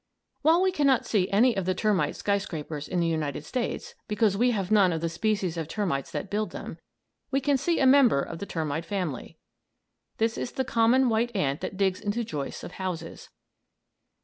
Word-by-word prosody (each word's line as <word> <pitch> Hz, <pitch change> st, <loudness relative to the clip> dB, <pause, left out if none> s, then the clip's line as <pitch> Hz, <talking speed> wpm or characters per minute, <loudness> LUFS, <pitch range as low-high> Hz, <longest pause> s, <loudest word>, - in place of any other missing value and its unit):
While 325 Hz, +5 st, +4 dB
we 380 Hz, -, +3 dB
cannot 280 Hz, -7 st, +2 dB
see 195 Hz, -4 st, +1 dB
any 230 Hz, +4 st, +4 dB
of 195 Hz, -2 st, -1 dB
the 185 Hz, 0 st, 0 dB
termite 210 Hz, 0 st, +1 dB
skyscrapers 160 Hz, -7 st, -3 dB
in 180 Hz, -, -1 dB
the 170 Hz, -, +2 dB
United 155 Hz, -3 st, -2 dB
States, 250 Hz, -2 st, -3 dB
because 210 Hz, -1 st, +2 dB
we 245 Hz, +5 st, +3 dB
have 200 Hz, -4 st, -1 dB
none 200 Hz, -4 st, +5 dB
of 165 Hz, -, -1 dB
the 165 Hz, +1 st, -1 dB
species 185 Hz, -1 st, -1 dB
of 160 Hz, -2 st, -3 dB
termites 165 Hz, -7 st, -2 dB
that 170 Hz, +3 st, -5 dB
build 210 Hz, +1 st, -1 dB
them, -, -, -8 dB, 0.5 s
we 270 Hz, -, +1 dB
can 280 Hz, +1 st, +2 dB
see 330 Hz, +6 st, 0 dB
a 270 Hz, -, +3 dB
member 260 Hz, -, +5 dB
of 165 Hz, -, -7 dB
the 200 Hz, -, -5 dB
termite 160 Hz, -1 st, -2 dB
family. 175 Hz, -6 st, -4 dB, 0.8 s
This 225 Hz, 0 st, 0 dB
is -, -, -4 dB
the 265 Hz, -, -1 dB
common 245 Hz, +2 st, +3 dB
white 230 Hz, +1 st, 0 dB
ant 140 Hz, -7 st, 0 dB
that 190 Hz, -, -5 dB
digs 190 Hz, -2 st, +1 dB
into 210 Hz, +3 st, -1 dB
joists 150 Hz, -10 st, -5 dB
of -, -, -7 dB
houses. 175 Hz, -3 st, -5 dB
200 Hz, 195 wpm, -27 LUFS, 165-235 Hz, 0.8 s, none